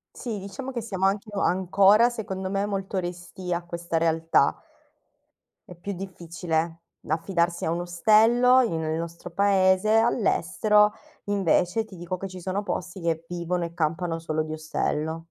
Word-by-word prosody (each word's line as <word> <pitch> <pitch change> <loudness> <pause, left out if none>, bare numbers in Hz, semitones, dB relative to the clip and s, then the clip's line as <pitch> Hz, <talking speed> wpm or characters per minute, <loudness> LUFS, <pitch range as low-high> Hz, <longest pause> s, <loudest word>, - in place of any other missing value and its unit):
Sì, 225 -5 -4
diciamo 200 +8 -7
che 240 -2 -3
siamo 190 -4 -2
anche 200 +2 0
ancora 195 +4 +4
secondo 190 -5 -5
me 195 +1 0
molto 195 -1 -3
restii 180 0 -4
a 170 - -2
questa 170 -1 -3
realtà. 165 0 +2 1.1
È 180 - -11
più 200 +4 -6
difficile 170 -3 -3 0.3
affidarsi 170 +1 0
a 160 - 0
un 170 +1 -1
ostello 225 +8 +4
in 170 -10 -1
nel 160 0 -2
nostro 170 +1 -6
paese, 190 +1 +3
all'estero, 210 -2 +3 0.3
invece 200 +1 +1
ti 200 -4 -13
dico 175 +1 -5
che 195 - -5
ci 185 -1 -10
sono 190 +3 -2
posti, 185 -2 -4
che 165 -1 -1
vivono 175 0 -2
e 170 - -8
campano 165 +1 -1
solo 155 -1 -2
di 155 - -6
ostello. 155 +1 -2
180 Hz, 155 wpm, -25 LUFS, 170-200 Hz, 1.1 s, ancora